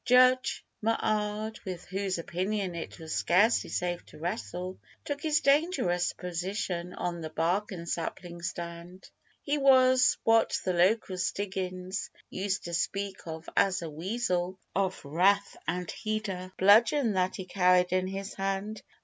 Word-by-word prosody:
Judge 255 +1 +4 0.2
M'Ard 215 -1 -1
with 180 -3 -6
whose 195 -1 -2
opinion 185 +3 -2
it 170 -1 -6
was 160 -2 -6
scarcely 205 +7 +3
safe 175 -1 -2
to - - -14
wrestle 175 - -4 0.3
Took 285 0 -3
his 310 0 +2
dangerous 275 - +2
position 180 0 -3
on 170 -1 -3
the 160 - -5
bark 175 +7 0
and 170 -3 -6
sapling 170 +1 -4
stand: 170 +1 -6 0.4
He 290 0 0
was 260 -2 +5
what 225 0 +3
the 185 - +1
local 185 +1 +2
Stiggins 185 +1 -3 0.2
used 195 +1 -2
to 170 - -6
speak 195 +2 -2
of 160 0 -7
as 190 -3 +3
a 160 - -5
'wessel 180 +1 -1 0.2
'Of 190 -5 -1
wrath,' 195 +7 +2
and 180 +1 -2
he'd 215 -1 -3
a 185 0 -5
bludgeon 225 +5 +5
that 185 -1 +1
he 190 - -6
carried 180 -1 +3
in 185 0 +1
his 195 +1 -5
hand. 195 +2 -3
185 Hz, 145 wpm, -29 LUFS, 175-215 Hz, 0.4 s, was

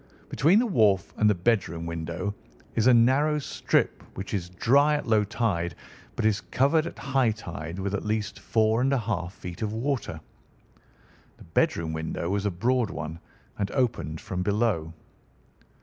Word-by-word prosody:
Between 165 +8 +4
the 240 - +4
wharf 105 - +2
and 105 - +4
the 105 - +3
bedroom 85 -4 0
window 85 +4 -3 0.4
is 115 +1 +2
a - - +8
narrow 135 +6 +4
strip, 145 - 0 0.2
which 95 +2 -5
is 90 -4 -2
dry 140 +11 +3
at 145 - -3
low 110 -2 +4
tide 95 -7 -1 0.4
but 110 - -1
is 105 -1 +2
covered 155 +5 +2
at - - -8
high 135 -3 +1
tide 85 -6 -6
with 100 +1 -3
at 100 - -2
least 105 0 -2
four 110 +1 +2
and 135 +2 +2
a - - +3
half 100 -7 -2
feet 90 -1 -9
of 105 -1 -1
water. 120 - -2 1.2
The - - -14
bedroom 80 -1 0
window 80 +2 -3
was 100 +1 0
a - - +2
broad 120 +5 +1
one 80 +2 -6 0.4
and 100 -1 0
opened 100 - -1
from 90 -1 -4
below. 100 -5 0
105 Hz, 165 wpm, -27 LUFS, 90-125 Hz, 1.2 s, a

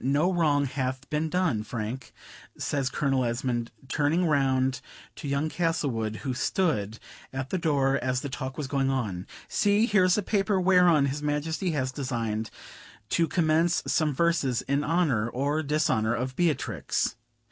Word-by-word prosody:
No 145 +8 +2
wrong 150 -5 +2
hath 130 0 -3
been 155 +1 0
done, 160 -10 +1
Frank," 115 +3 -5 0.5
says 140 -2 -1
Colonel 135 -1 0
Esmond, 120 0 -1 0.2
turning 150 +6 +1
round 135 -4 +1 0.4
to - - -6
young 140 +2 0
Castlewood, 140 -10 -1
who 130 - -1
stood 125 - 0 0.3
at 130 0 -5
the 185 - 0
door 140 -4 +2
as 130 0 0
the - - -4
talk 130 -1 -5
was 150 - -2
going 135 0 0
on. 105 -9 -2 0.2
"See! 205 +1 +3
here 205 -5 +3
is 180 +2 +3
a 210 - 0
paper 200 -1 +1
whereon 180 -5 +5
his 140 +2 -2
Majesty 150 +5 -1
has 130 -3 -1
deigned 115 -5 -3 0.6
to 165 -1 +2
commence 165 +1 +2
some 155 -2 +1
verses 145 -5 +1
in 140 +2 0
honor, 150 -10 +1
or 140 +5 0
dishonor, 140 -7 +1
of 130 +2 -3
Beatrix. 130 - 0
140 Hz, 155 wpm, -27 LUFS, 130-160 Hz, 0.6 s, whereon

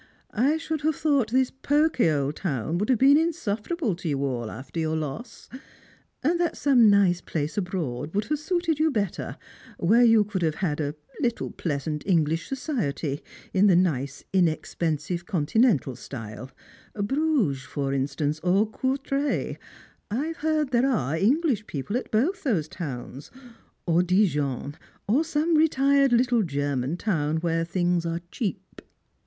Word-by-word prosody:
1 275 +8 +2
5BTonld 320 -1 -3
have 310 0 +1
thought 280 -7 +1
this 260 0 +2
pokey 290 - +2
old 145 -1 0
town 155 - -2
would 210 - -1
have 255 - +4
been 275 +4 +6
insutierable 310 - -1
to 170 -1 -5
you 140 -1 0
all 120 -4 -3
alter 130 +7 -7
your 160 0 0
loss, 160 - -6 0.8
and 335 +5 +2
that 345 -1 0
some 250 -6 +5
nice 195 -3 +4
place 155 -2 -3
abroad 165 -6 -3
would 205 +1 +1
have 300 0 -1
suited 335 -1 -1
you 315 +1 +3
better, 210 - -3 0.4
where 220 +8 +4
you 225 -2 +6
could 200 -2 -4
have 160 -2 +1
had 160 -5 -1
a 145 0 -2 0.2
little 240 -4 -1
pleasant 150 -1 -3
English 165 -3 +1
societ}' 170 - -2 0.3
in 200 +2 +4
the 185 - +5
nice 140 -6 0
inexpen 165 -2 +1
sive 175 +2 -5
continental 180 - +2
stjde 120 0 -8 0.3
— - - -27
Bruges 270 - +1
for 140 -1 -3
instance, 145 +3 -1
or 190 +5 +2
Courtrai 275 +3 -1 0.3
— - - -32
I've 300 +10 -2
heard 305 -2 0
there 250 +2 +3
are 155 - 0
English 240 - +1
people 150 - -4
at 250 - -2
both 325 - +1
those 200 - 0
towns; 140 -4 -7 0.6
or 170 0 +3
Dijon, 150 - 0 0.3
or 255 +10 +3
some 320 +1 0
retired 280 -3 +4
little 240 -1 +3
German 140 -3 -1
town 160 -7 0
where 165 0 0
things 175 0 0
are 165 +1 -2
cheap." 195 -5 -5
190 Hz, 155 wpm, -26 LUFS, -, 0.8 s, been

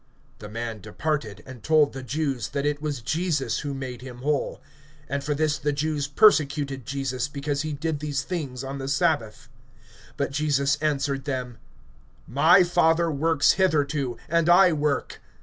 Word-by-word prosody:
(15)The 105 0 -9
man 115 -1 -5
departed, 110 -1 -3
and 130 -3 -11
told 155 +2 +3
the 135 - -6
Jews 130 -2 -2
that 140 0 -2
it 145 0 -1
was 145 -6 -3
Jesus 150 -5 -1
who 140 -1 -4
made 130 -3 -6
him 125 -1 -10
whole. 145 -1 -1 0.5
(16)And 140 0 -1
for 145 +1 -2
this 150 0 0
the 150 0 0
Jews 145 0 -1
persecuted 140 - +3
Jesus, 135 -2 -2
because 145 0 -3
he 155 0 -3
did 150 +1 -2
these 145 -2 -2
things 140 -8 -4
on 135 +1 -5
the 135 - -5
sabbath. 140 -6 0 0.7
(17)But 140 -1 -1
Jesus 140 -1 +1
answered 140 -3 -1
them: 125 -4 -4 0.7
My 160 +8 +5
Father 170 -1 +2
works 155 0 +3
hitherto, 145 -8 0
and 170 0 +2
I 180 0 +6
work. 150 -2 -1
145 Hz, 160 wpm, -25 LUFS, 135-155 Hz, 0.7 s, I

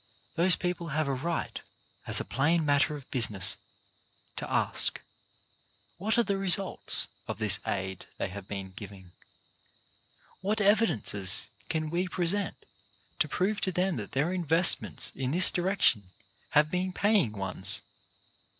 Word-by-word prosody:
Those 175 +2 +4
people 180 -1 -4
have 155 0 -2
a 140 - -1
right, 165 +6 -4 0.5
as - - 0
a - - -5
plain 160 +5 0
matter 145 +1 +1
of 140 -2 -11
business, 105 -5 +2 0.8
to - - -7
ask - - +3 1.0
what 215 +5 -1
are 235 - +3
the 200 -3 -2
results 195 0 +2 0.2
of - - -5
this 105 -3 +3
aid 95 -1 -4
they - - -3
have 100 0 -10
been 95 -2 -7
giving. 95 -2 -12 1.3
What 210 +3 -2
evidences 130 - +2 0.2
can 155 -1 -3
we 180 +2 -1
present 185 +3 +1 0.6
to - - +3
prove 200 +3 -2
to 190 - -1
them 180 -2 -1
that 105 -3 -7
their 150 +7 -1
investments 170 -1 +3
in 130 -1 -4
this 175 +6 +6
direc 190 +3 -2
tion 105 -3 +3 0.4
have 150 +1 +2
been 185 +1 -2
paying 200 - +1
ones? 95 -1 -2
160 Hz, 140 wpm, -28 LUFS, -, 1.3 s, this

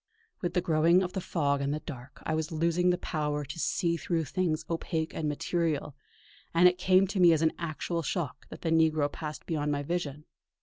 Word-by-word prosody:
With 175 - -2
the 180 - +3
growing 170 +3 +4
of 180 - -4
the 190 - -2
fog 140 -5 0
and 140 0 0
the 150 - -1
dark, 130 -3 -10
I 160 - 0
was 155 0 -1
losing 170 +3 +2
the 180 - +3
power 150 -4 -2
to 155 +5 -7
see 170 +1 0
through 165 -1 -1
things 160 -1 -1
opaque 165 -1 -2
and 155 -2 -2
material; 150 -1 -1 0.6
and 175 +2 +7
it 180 0 +2
came 185 +1 +5
to 195 +1 -3
me 175 -2 +7
as 160 0 +1
an 160 - +3
actual 170 +1 -2
shock 160 -2 -3
that - - -10
the 165 - -1
negro 155 -3 +3
passed 155 -1 -6
beyond 150 -2 -1
my 145 0 -1
vision. 150 -2 -3
160 Hz, 210 wpm, -29 LUFS, 150-175 Hz, 0.6 s, and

